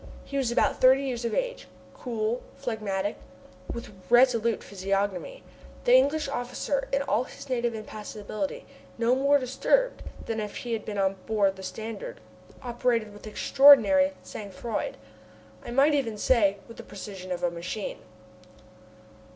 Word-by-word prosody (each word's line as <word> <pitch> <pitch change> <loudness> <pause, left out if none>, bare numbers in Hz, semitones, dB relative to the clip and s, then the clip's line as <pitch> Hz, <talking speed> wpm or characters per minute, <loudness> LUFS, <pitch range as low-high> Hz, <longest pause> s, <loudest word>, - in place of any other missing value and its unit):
He 280 - -8
was 265 -4 +1
about - - +1
thirty 260 +2 +6
years 250 -3 -3
of 235 - -1
age, - - -2 0.3
cool, 230 -1 -2
phlegmatic, 210 -5 -3 0.5
with 235 -3 -7 0.2
resolute 235 -2 +4
physiognomy 200 - -2 0.4
the - - +4
English 315 - +4
officer 270 +1 -2
in 275 0 +1
all 255 -3 +1
his 280 +1 -11
native 240 -2 0
impassibility 215 - -5 0.3
no 235 +1 +3
more 280 +2 +4
disturbed 395 - +1 0.2
than 225 -1 -2
if 210 -1 -5
he 240 -2 -4
had 220 - -3
been 210 -1 -5
on 195 0 +1
board 205 -3 +2
the 190 - -10
Standard, 225 - -6 0.4
operating 240 -3 0
with 205 +1 -11
extraordinary 280 +4 +6
sang 205 -2 -8
froid, 220 +4 -4 0.7
I - - -8
might 275 +5 +4
even 240 -7 0
say, 205 -3 +3
with 230 - -12
the - - -7
precision 190 -2 -8
of 180 0 -3
a 175 - +2
machine. 180 +5 -5
235 Hz, 145 wpm, -27 LUFS, 210-275 Hz, 0.7 s, thirty